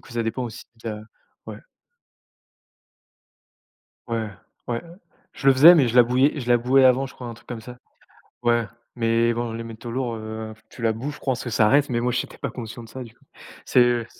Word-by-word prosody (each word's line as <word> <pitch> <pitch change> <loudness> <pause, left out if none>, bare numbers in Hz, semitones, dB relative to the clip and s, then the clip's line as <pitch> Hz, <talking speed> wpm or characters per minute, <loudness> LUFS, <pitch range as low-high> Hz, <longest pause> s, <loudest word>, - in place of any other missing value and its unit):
coup - - -17
ça 120 -1 -2
dépend 120 +3 -2
aussi 115 -3 -7 0.2
da 110 -2 -4 0.5
ouais - - -8 2.5
Ouais, 115 -2 -2 0.4
ouais, 120 -1 -2 0.5
je 135 - 0
le - - +8
faisais, 155 +7 +9
mais 140 -7 +4
je 120 - -2
la 125 - +8
bouillais 130 +5 +2
je 120 - -6
la 120 - +6
bouillais 130 +3 +4
avant, 130 +1 +4
je 135 - -14
crois, 125 - -9
un 120 - -6
truc 115 - -20
comme 120 -2 -6
ça. 125 +2 -11 0.7
Ouais, 120 -1 +2 0.3
mais 115 0 +2
bon, 120 0 -3
les 115 +1 -5
métaux 115 +1 -8
lourds, 125 -1 -2
heu, 110 0 -6 0.2
tu - - -13
la 115 -1 +2
bous, 125 +7 -5
je - - -12
pense 130 -3 -2
que 120 - -4
ça 110 -1 +3
reste, 145 +4 +3
mais 120 -2 0
moi, 125 +1 0
j'étais - - -3
pas 140 - -4
conscient 120 0 -8
de - - -12
ça, 130 +3 -7
du 115 -2 -13
coup. - - -30 0.4
C'est - - +3
heu 120 -1 +2
120 Hz, 215 wpm, -23 LUFS, 115-130 Hz, 2.5 s, faisais